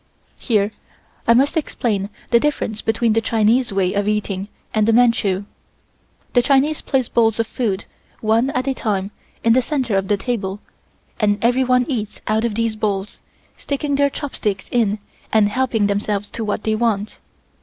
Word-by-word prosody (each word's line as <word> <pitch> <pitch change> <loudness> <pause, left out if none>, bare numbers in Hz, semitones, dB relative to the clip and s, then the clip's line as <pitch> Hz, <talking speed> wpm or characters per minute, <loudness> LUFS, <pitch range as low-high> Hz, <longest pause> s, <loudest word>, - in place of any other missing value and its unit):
Here 210 -4 +1 0.6
I 235 - +6
must 275 +6 +3
explain 215 -10 -1 0.2
the 235 - +6
difference 235 -6 -1
between 225 0 +1
the 225 - +2
Chinese 225 +2 +2
way 190 -2 +1
of 205 0 0
eating 205 -2 -1 0.3
and 215 -1 +2
the 225 - +4
Manchu. 220 -5 +3 0.9
The 245 - +5
Chinese 280 +4 +2
place 260 -4 0
the - - -25
bowls 225 -1 +3
of 230 - +2
food, 210 -4 -2 0.3
one 225 +4 +2
at 255 -1 -2
a 270 - +2
time, 200 -5 -2 0.3
in 230 - +5
the 255 - +4
center 255 -5 -1
of 195 0 0
the 205 - +2
table 200 -4 -3 0.6
and 205 -2 +2
everyone 250 +1 +3
eats 220 -7 -3
out 220 +2 +1
of 225 -3 -1
these 230 -1 0
bowls, 205 -2 -2 0.4
sticking 285 0 -2
their 280 0 +3
chopsticks 215 -9 -3
in 220 -4 +2 0.3
and 215 -2 +4
helping 230 -2 +1
themselves 205 0 -1
to 230 - -4
what 210 0 -2
they 220 - +1
want. 215 -2 -1
225 Hz, 170 wpm, -20 LUFS, 205-245 Hz, 0.9 s, I